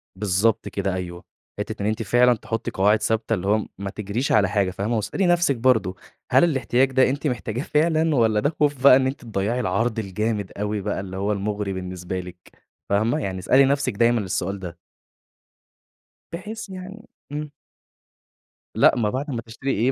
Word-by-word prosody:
بالضبط 105 +3 +1
كده 100 -1 -2
أيوه. 90 -1 -5 0.4
حتة - - -4
إن 100 - -1
أنتِ 110 +1 -1
فعلًا 120 +4 +4
تحطي 115 0 -4
قواعد 105 +3 +3
ثابتة، 110 0 0
اللي 95 -3 -2
هو 105 +1 +2
ما 100 0 -4
تجريش 105 +6 -3
على 100 -3 +4
حاجة 100 -3 +1
فاهمة، 100 +5 -2
واسألي 110 - -1
نفسِك 175 -5 +3
برضو 110 -7 +2 0.3
هل - - +6
الاحتياج 135 -4 +2
ده 130 0 +4
أنتِ 140 +3 -2
محتاجاه 115 -2 -3
فعلًا، 160 +1 +2
والّا 110 -4 +3
ده 145 - +1
خوف 145 -3 +1
بقى 140 - +9
إن 130 0 +3
أنتِ 135 +2 -4
تضيَّعي 110 +1 -2
العرض 115 +2 0
الجامد 105 0 -2
أوي 105 0 -2
بقى 100 0 -2
اللي 95 -1 -6
هو 100 +2 -1
المُغري 105 0 -2
بالنسبة 90 0 -5
لِك 90 -1 -9 0.5
فاهمة، 110 +8 +1
يعني 95 -8 -3
اسألي 130 +8 +4
نفسِك 140 -2 +1
دايمًا 120 +1 +3
السؤال 95 0 -2
ده. 90 -3 -8 1.6
بحيث 210 +5 -6
يعني 190 +4 -9 0.2
إمم. 150 0 -5 1.2
لأ، - - +5
ما 110 -4 +1
بعد 135 +7 -3
ما 120 -3 -3
تشتري 115 +4 -4
إيه 120 +6 +2
110 Hz, 175 wpm, -23 LUFS, 100-130 Hz, 1.6 s, بقى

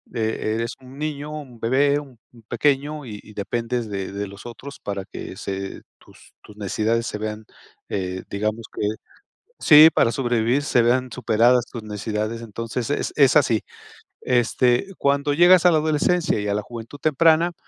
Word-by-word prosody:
E 110 -1 -1
eres 115 0 -2
un 130 +2 -13
niño, 150 -1 -4
un 135 -6 -9
bebé, 140 +5 +2
un 135 -5 -13 0.3
pequeño, 145 +3 0
y 105 -3 -8
y 105 - -15
dependes 115 +2 -3
de 95 -1 -4
de 100 0 -4
los 100 +4 -12
otros, 130 +4 -9
para 100 -1 -4
que - - -8
se 95 0 -5 0.2
tus - - -20
tus 105 - -15
necesidades 110 +3 -1
se 105 - -4
vean, 110 0 -5 0.4
eh, 95 -1 -3
digamos, 110 +2 -2
que - - -4 0.8
Sí, 155 0 +9
para 115 - +3
sobrevivir, 120 +2 0
se 125 -4 +3
vean 125 +2 +2
superadas 120 +1 +3
tus 120 - -8
necesidades. 105 +2 -4
Entonces, 115 +3 -5
es 145 - -2
es 140 -2 +5
así. 120 -6 +2 0.6
Este, 125 - +2
cuando 140 +1 +1
llegas 175 +2 +6
a 175 - +7
la 160 - +4
adolescencia, 155 -1 +1
y 105 - -3
a - - +1
la 105 - -1
juventud 120 +5 -10
temprana, 165 +3 +3
120 Hz, 165 wpm, -22 LUFS, 110-145 Hz, 0.8 s, Sí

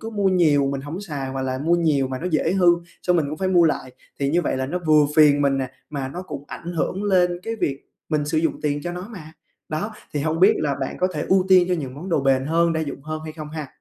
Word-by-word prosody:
cứ 225 - -6
mua 205 -3 +1
nhiều 155 -7 +3
mình 135 - -3
hổng 150 +6 -6
xài 145 -9 -5
hoặc 135 0 -3
là 130 0 -2
mua 165 +5 +2
nhiều 150 -6 +2
mà 130 -1 -4
nó 180 - -4
dễ 160 +2 +1
hư, 185 -2 +2 0.4
xong 180 -1 +2
mình 155 - +1
cũng 155 - -5
phải 190 - 0
mua 175 -2 +5
lại 130 -5 -1 0.3
thì 140 - +1
như 175 +2 +2
vậy 130 - -1
là 130 0 -2
nó 180 +6 -2
vừa 150 -2 +5
phiền 145 -2 +6
mình 135 -1 +2
nè, 130 -2 -3 0.2
mà 140 -3 -3
nó 175 +7 -6
cũng 165 -6 -8
ảnh 170 +1 -7
hưởng 180 +4 -2
lên 180 -3 +2
cái 225 0 -4
việc 140 -8 -2 0.3
mình 150 -2 0
sử 155 +2 0
dụng 160 0 -1
tiền 145 -1 0
cho 175 +2 -4
nó 180 +3 -7
mà 160 -8 -10 0.4
đó. 185 +8 -3 0.2
Thì 145 - 0
hông 160 +3 -1
biết 190 - +7
là 145 -2 0
bạn 135 - -3
có 185 - +2
thể - - -2
ưu 190 -1 +4
tiên 185 -2 +7
cho 180 - +2
những 135 -6 -5
món 160 +7 -8
đồ 165 -5 +2
bền 135 -1 +2
hơn, 165 +2 +2
đa 160 - -1
dụng 140 -3 -5
hơn 155 +1 -5
hay 155 - -6
không 155 -1 -8
ha? 155 -2 -5
155 Hz, 285 wpm, -22 LUFS, 140-180 Hz, 0.4 s, biết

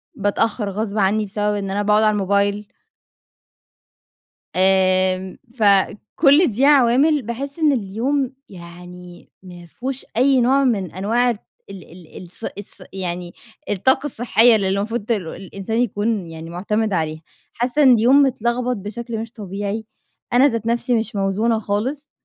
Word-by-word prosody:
باتأخّر 205 +1 -1
غصب 210 +1 -3
عني 210 +2 +1
بسبب 210 +1 -2
إن 195 -1 -4
أنا 205 +1 -1
باقعد 210 +1 +3
على 215 - +4
الموبايل 200 +1 0 1.8
آمم 185 0 +2 0.2
فكل 225 - +3
دي 245 +4 +1
عوامل 285 +2 +4
باحس 270 +6 -6
إن 310 -2 +4
اليوم 250 +4 -1 0.2
يعني 175 -1 -12
ما 175 -1 -12
فيهوش 260 +9 -6
أي 260 +1 +4
نوع 270 +3 +3
من 200 - 0
أنواع 225 +7 0
ال 235 - -2 0.3
ال 190 -5 -11 0.3
ال - - -9
الص 180 +5 -9
الص 205 - -9
يعني 175 -2 -5 0.4
الطاقة 260 +8 +2
الصحية 240 -3 +3
اللي 195 -3 0
المفروض 205 +3 -2
ت - - -3
الإنسان 195 +3 -3
يكون 210 -4 -1
يعني 160 +1 -9
مُعتمِد 210 +4 -2
عليها. 155 -2 -2 0.3
حاسة 250 +5 0
إن 260 -3 +7
اليوم 245 +5 +5
متلغبط 250 -1 0
بشكل 225 +4 -6
مش 225 0 -6
طبيعي. 205 +1 -5 0.5
أنا 255 +3 +6
ذات 230 -4 -3
نفسي 240 +1 0
مش 220 - -5
موزونة 205 +4 0
خالص، 245 +8 -3
215 Hz, 140 wpm, -20 LUFS, 195-245 Hz, 1.8 s, إن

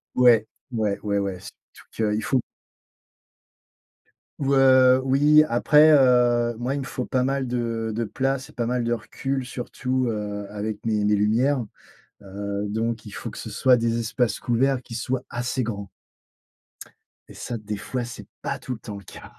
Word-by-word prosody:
Ouais, 120 -3 +5 0.2
ouais, 105 -4 0
ouais 100 -1 0
ouais, 100 -2 -2
surtout 110 -2 -6
qu'il 110 +1 -1
faut 130 - +1 2.0
Ou 140 0 +1
heu, 130 -1 +6
oui, 145 +3 +5
après 150 +6 +5
heu, 120 -3 +4
moi, 125 +3 -2
il 140 - -2
me - - -4
faut 125 - -4
pas 130 -1 0
mal 135 0 -1
de 115 -2 -2
de 115 - -1
place 135 +4 -2
et - - -16
pas 120 -2 -2
mal 125 0 0
de 120 - -1
recul, 130 +3 -3
surtout, 125 +1 -2
heu, 105 -2 -4
avec 105 +1 -5
mes 105 -2 +1
mes 105 0 +3
lumières. 120 +6 +2 0.6
Heu, 100 +1 -4
donc, 110 +2 -2
il 105 - -9
faut - - -6
que - - -9
ce - - -7
soient 130 -1 +4
des 115 0 0
espaces 115 0 -1
couverts 130 +2 +1
qui 115 - -10
soient 125 +2 -2
assez 120 +2 -2
grands 100 -4 -5 1.4
et - - -13
ça, 120 - -5
des 105 0 -5
fois, 125 +3 -4
c'est 120 - -9 0.2
pas - - -3
tout 130 - -5
le 110 - -8
temps 105 -3 -8
le 100 - -11
cas - - -12
120 Hz, 175 wpm, -24 LUFS, 110-130 Hz, 2.0 s, heu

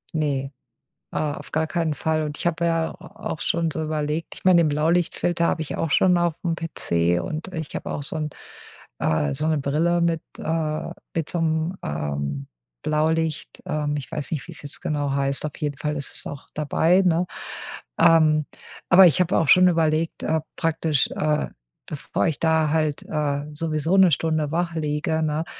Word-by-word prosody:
Ne, 140 -3 -1 0.6
ah, 150 -2 -1
auf - - -10
gar 160 +1 +1
keinen 165 -1 0
Fall. 155 +2 0
Und 145 -1 -4
ich - - 0
habe 170 0 0
ja 165 -1 +1
a 215 +2 -8
auch 155 - -9
schon 165 -1 +1
so 160 - -3
überlegt 155 +1 -2
ich - - -13
meine, 180 -2 +7
den - - +3
Blaulichtfilter 170 +3 +1
habe 160 - 0
ich 155 - -4
auch 165 - -1
schon 180 +2 +4
auf'm 170 0 0
PC 85 - 0
und 165 +4 -5
ich 160 -4 -5
habe - - -4
auch - - -3
so - - -6
'n, 155 -1 -2 0.7
äh 75 -2 +1
so 150 +3 -1
'ne 155 -2 +2
Brille 165 +5 +1
mit, 165 -1 +1 0.2
äh 155 -1 -2 0.2
mit 165 -2 -1
so 175 - -1
'nem 75 - -2 0.4
Blaulicht 155 0 0
ähm, 150 -4 -1
ich 135 - -7
weiß 150 - -3
nicht, 155 -5 -3
wie's 170 - -6
jetzt 145 - -6
genau 145 -2 -1
heißt, 140 +1 0
auf 150 - -5
jeden 145 -2 -3
Fall 150 0 -2
ist 140 -2 -3
es - - +1
auch 145 -1 -9
dabei, 165 +4 +3
ne? 175 0 +3 0.7
Ähm, 155 -2 +5 0.4
aber 185 +1 +9
ich 170 +2 +3
habe 180 +2 +2
auch 160 - +2
schon 185 0 +7
überlegt, 165 -1 +1
äh, 160 0 +1 0.2
praktisch, 160 -4 +1
äh, 150 0 0 0.4
bevor 100 - -1
ich 160 - -2
da 160 -1 +3
halt, 155 -2 0
äh, 145 -2 -1
sowieso 155 +2 0
1 185 -3 +7
Stunde 155 +1 0
wach 170 0 -1
liege, 155 +1 -1
ne, 155 +1 -1
155 Hz, 185 wpm, -24 LUFS, 150-165 Hz, 0.7 s, aber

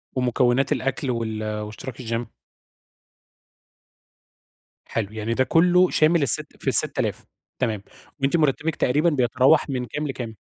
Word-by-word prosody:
ومكونات 125 +1 +1
الأكل 135 0 -2
وال 110 -2 -4 0.2
واشتراك 110 +4 -8
الgym؟ 115 0 -3 2.6
حلو 110 -2 -4
يعني 110 +1 -3
ده 130 +3 +1
كلّه 180 +4 +3
شامل 155 0 +2
السِتّ 120 - +5
في - - -8
ال6000 - - +2 0.3
تمام، 110 -6 -2 0.4
وأنتِ 140 +5 +1
مرتبِّك 155 +1 0
تقريبًا 150 +7 +1
بيتراوح 130 +2 +2
من 125 -2 -3
كام 150 +6 -5
لكام؟ 120 -4 -6
130 Hz, 120 wpm, -22 LUFS, 115-150 Hz, 2.6 s, السِتّ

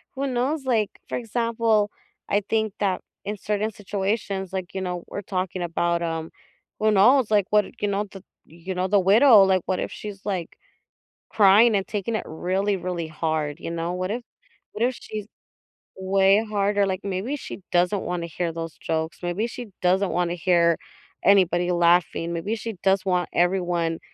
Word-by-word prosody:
who 275 +1 -2
knows? 265 +4 -1
Like, 230 -6 +1 0.2
for - - -2
example, 230 -2 +1 0.4
I 205 +1 +2
think 220 -2 0
that 190 -3 0 0.2
in 210 - -3
certain 210 +2 -1
situations 195 -1 -3
like, 185 -2 -4
you 190 - -3
know, 180 -2 -3
we're 200 - -5
talking 185 -2 -3
about, 170 0 0
um, 165 -1 -3 0.5
who 215 - +3
knows? 230 +5 +5
Like, 205 -3 +3
what 210 -1 +4 0.2
you 205 - +1
know, 200 +1 0
the 195 -1 -12 0.2
you 170 +3 -7
know, 180 +1 -1
the 200 +1 +4
widow, 210 +3 +7
like, 190 -1 +3
what 185 - 0
if - - -3
she's, 205 -2 -8
like, 185 -5 -3 0.8
crying 210 +3 +6
and 195 -1 0
taking 210 +2 -3
it 220 - -2
really, 190 +5 -1
really 175 -3 -4
hard? 155 -1 -2
You - - -5
know? 170 +1 -2
What 185 +1 -3
if 240 +2 -3 0.5
what 220 - -1
if 255 -1 -2
she's 210 -2 -6 0.7
way 195 +2 +3
harder? 205 -1 +1
Like, 190 0 -2
maybe 200 +8 -2
she 270 - -8
doesn't 180 +3 +2
wanna 175 -1 -3
hear 170 +1 -3
those 165 0 -6
jokes, 160 0 -2
maybe 175 +5 -1
she 245 0 -7
doesn't 185 +2 +2
wanna 175 -1 0
hear 170 -2 +3 0.5
anybody 180 -2 +4
laughing, 170 -1 +2
maybe 195 +7 -2
she 225 0 -5
does 195 0 +2
want 180 -2 +1
everyone 175 -2 +1
190 Hz, 175 wpm, -24 LUFS, 175-210 Hz, 0.8 s, widow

